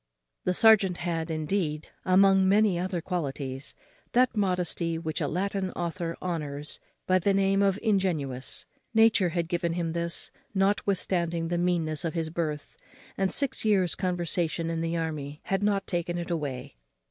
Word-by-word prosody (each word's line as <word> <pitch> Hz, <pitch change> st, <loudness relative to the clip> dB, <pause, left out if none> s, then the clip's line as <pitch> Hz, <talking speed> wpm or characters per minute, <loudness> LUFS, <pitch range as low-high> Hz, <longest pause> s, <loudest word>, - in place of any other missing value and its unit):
The 180 Hz, -, +1 dB
serjeant 195 Hz, -5 st, +5 dB
had, 165 Hz, -2 st, -2 dB
indeed, 155 Hz, -1 st, -2 dB, 0.2 s
among 190 Hz, 0 st, +5 dB
many 200 Hz, -3 st, +4 dB
other 180 Hz, -1 st, -2 dB
qualities, 140 Hz, -6 st, -4 dB, 0.4 s
that 250 Hz, -1 st, +3 dB
modesty 180 Hz, -4 st, 0 dB
which 160 Hz, -1 st, -3 dB
a 145 Hz, -, +1 dB
Latin 190 Hz, +3 st, -1 dB
author 170 Hz, -1 st, -3 dB
honours 150 Hz, -5 st, -4 dB, 0.3 s
by 185 Hz, 0 st, +3 dB
the 195 Hz, +2 st, +2 dB
name 195 Hz, 0 st, +3 dB
of 195 Hz, -1 st, +3 dB
ingenuous: 170 Hz, -, -1 dB, 0.3 s
nature 225 Hz, -5 st, +5 dB
had 170 Hz, 0 st, -1 dB
given 170 Hz, -1 st, -1 dB
him 170 Hz, -1 st, -1 dB
this, 170 Hz, 0 st, -1 dB, 0.2 s
notwithstanding 185 Hz, -4 st, +1 dB
the 175 Hz, 0 st, 0 dB
meanness 165 Hz, -4 st, 0 dB
of 165 Hz, 0 st, -2 dB
his 160 Hz, -1 st, -2 dB
birth; 155 Hz, -3 st, -4 dB, 0.4 s
and 195 Hz, -1 st, 0 dB
six 275 Hz, -2 st, +1 dB
years' 190 Hz, -7 st, +3 dB
conversation 175 Hz, -2 st, -1 dB
in 165 Hz, 0 st, -2 dB
the 165 Hz, 0 st, -1 dB
army 150 Hz, -3 st, -4 dB
had 195 Hz, 0 st, -1 dB
not 200 Hz, -1 st, +1 dB
taken 175 Hz, 0 st, -2 dB
it 175 Hz, 0 st, -4 dB
away. 140 Hz, -, -4 dB
175 Hz, 150 wpm, -28 LUFS, 160-195 Hz, 0.4 s, serjeant